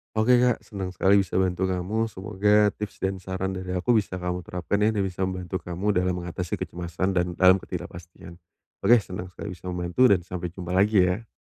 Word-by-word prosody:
Oke 120 +3 +4
Kak, 125 -1 +2
senang 95 -3 -6
sekali 100 +1 +4
bisa 95 -3 -2
bantu 95 0 +1
kamu. 95 +5 -1
Semoga 105 +1 +2
tips 105 -1 -8
dan 95 0 -1
saran 95 0 -3
dari 95 -1 -4
aku 90 +7 +1
bisa 95 -2 -5
kamu 90 0 -4
terapkan 90 +3 -2
ya 105 - +3
dan 100 - +1
bisa 95 0 -2
membantu 95 0 -4
kamu 90 +4 -2
dalam 90 -1 +1
mengatasi 90 0 -4
kecemasan 85 +2 -3
dan 90 -2 +1
dalam 95 +1 +6
ketidakpastian. 85 0 -9 0.4
Oke 120 - +6
senang 90 -1 -6
sekali 95 +2 -8
bisa 90 0 -10
membantu 90 +7 +2
dan 95 -5 +3
sampai 90 -1 -5
jumpa 90 -2 -6
lagi 100 +1 +4
ya. 90 +5 -1
95 Hz, 195 wpm, -25 LUFS, 90-100 Hz, 0.4 s, dalam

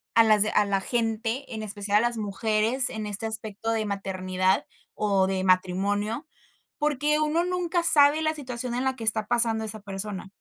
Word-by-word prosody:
a 230 - +7
las 215 -2 +5
a 210 - +3
la 195 -1 0
gente, 230 +3 -2
en 220 - -5
especial 205 0 +1
a - - +3
las 240 - -5
mujeres, 220 +4 +1
en 215 -1 -5
este 210 +2 -2
aspecto 220 0 -3
de 220 -1 -1
maternidad 185 -2 -1 0.3
o 200 -3 +1
de 190 0 -1
matrimonio, 200 - 0 0.5
porque 295 0 +1
uno 310 +3 +1
nunca 360 -1 -1
sabe 300 -2 +5
la 315 0 0
situación 250 -4 -4
en 250 - -1
la 265 0 0
que 230 - -7
está 220 -1 +2
pasando 225 -1 +2
esa 215 0 -4
persona. 195 -1 -5
220 Hz, 180 wpm, -26 LUFS, 200-255 Hz, 0.5 s, a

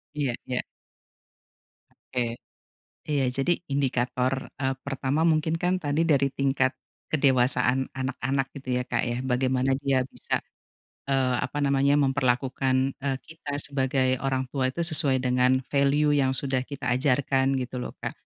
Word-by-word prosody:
Iya 140 -4 0 0.2
iya. 125 -1 -1 1.3
Oke. 120 -2 -3 0.7
Iya, 145 -3 0
jadi 135 +8 0
indikator, 130 -1 0
eee, 135 -1 0
pertama 135 +2 -1
mungkin, 160 -1 +2
kan, 180 +1 +2
tadi 150 -2 0
dari 140 -2 +3
tingkat 135 -1 +1 0.4
kedewasaan 130 -2 +3
anak-anak 130 +1 -2
gitu 125 -2 -2
ya, - - -4
Kak, - - 0
ya. 120 0 -2
Bagaimana 130 +1 +1
dia 135 -2 +1
bisa, - - -3 0.7
eee, 130 -2 +2
apa 130 +3 -3
namanya, 140 +1 +3
memperlakukan, 135 -1 +1
eee, 135 -1 -1
kita 155 -3 -6
sebagai 130 -2 0
orang 130 -1 0
tua 130 -2 +1
itu 170 +6 -2
sesuai 145 -5 +3
dengan 125 +1 +2
value 145 +2 +3
yang 130 -2 +2
sudah 135 -1 0
kita 130 -2 -3
ajarkan 135 0 +2
gitu 125 -1 -3
loh, - - -6
Kak. - - -2
135 Hz, 140 wpm, -26 LUFS, 130-140 Hz, 1.3 s, dari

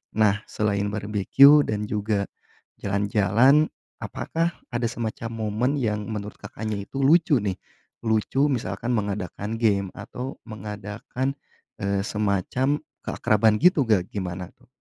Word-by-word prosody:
Nah, 105 -1 +3
selain 100 -1 0
barbekyu 110 +8 +5
dan 105 -1 -1
juga 105 -1 0 0.6
jalan-jalan, 105 +8 +3 0.3
apakah 165 +1 -2 0.2
ada 120 0 0
semacam 115 -1 -4
momen 110 +3 -1
yang 105 -3 -1
menurut 105 -2 -5
Kakaknya 105 0 -5
itu 135 - -4
lucu, 155 -2 +5
nih? 95 -3 -1 0.5
Lucu 110 +6 +2
misalkan 115 0 -2
mengadakan 105 +1 -3
game 100 -4 +2
atau 125 +2 -6
mengadakan, 105 +5 -4 0.5
eee, 100 0 0
semacam 105 +8 0 0.3
keakraban 110 0 +3
gitu, 175 -5 +5
nggak, 95 -5 +2
gimana 90 -2 -4
tuh? - - -26
105 Hz, 120 wpm, -25 LUFS, 100-125 Hz, 0.6 s, barbekyu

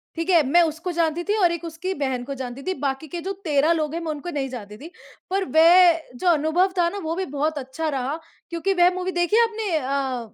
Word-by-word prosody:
ठीक 330 +3 -3
है। 340 -3 +6
मैं 345 +6 +5
उसको 325 +3 -3
जानती 335 0 0
थी 415 +3 0
और 355 -4 +4
एक 340 0 -4
उसकी 335 +4 -4
बहन 265 -5 -2
को 275 +2 -5
जानती 255 0 -6
थी, 375 - -1
बाकी 275 +1 -3
के 340 +3 -6
जो 390 +3 -3
13 300 0 +2
लोग 310 -2 0
हैं, 335 - -3
मैं 320 -2 -3
उनको 300 +4 -6
नहीं 275 -4 -3
जानती 210 -4 -8
थी। 320 +7 -11 0.4
पर 385 0 0
वह 340 0 +7
जो 360 - -3
अनुभव 335 +4 +2
था 345 -1 +3
ना, 405 - -7
वो 330 -4 -3
भी 380 - -2
बहुत 305 +1 0
अच्छा 280 +4 -4
रहा 275 +3 -2 0.3
क्योंकि 345 +3 -1
वह 355 -1 +5
मूवी 370 0 -2
देखी 350 +4 +1
है 470 - +6
आपने 440 -5 -2
अ, 260 -4 -3
325 Hz, 245 wpm, -23 LUFS, 280-355 Hz, 0.4 s, वह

